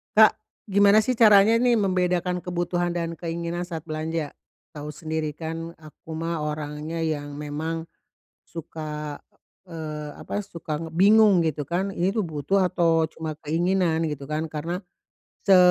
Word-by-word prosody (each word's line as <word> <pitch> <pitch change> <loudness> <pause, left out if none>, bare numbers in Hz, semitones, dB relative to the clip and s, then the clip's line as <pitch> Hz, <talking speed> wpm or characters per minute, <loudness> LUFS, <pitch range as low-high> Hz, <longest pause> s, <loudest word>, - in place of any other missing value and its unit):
Kak, 215 0 +7 0.3
gimana 200 +1 +6
sih 250 +4 +1
caranya 215 -1 +7
nih 240 0 +3
membedakan 180 -2 0
kebutuhan 175 0 -1
dan 170 -1 -3
keinginan 170 +1 -3
saat 175 -2 -5
belanja? 155 -1 -3 0.4
Tahu 150 0 -6
sendiri 155 0 -3
kan, 165 +2 -5
aku 155 +1 -13
mah 165 0 -2
orangnya 150 +2 -4
yang 150 -3 -2
memang 160 +3 -4 0.6
suka, 150 -2 -6 0.5
eee, 155 -3 -5
apa? 205 - -4
Suka 165 -6 -5
bingung 195 +2 +5
gitu 150 -3 -2
kan, 190 +3 -1
ini 180 0 0
tuh 215 - +1
butuh 170 +5 +1
atau 170 -3 +3
cuma 160 -2 -5
keinginan 165 0 +1
gitu 145 -2 -5
kan? 155 +3 -2
Karena 165 +4 -4 0.6
se 195 -2 +6
165 Hz, 140 wpm, -25 LUFS, 155-180 Hz, 0.6 s, Kak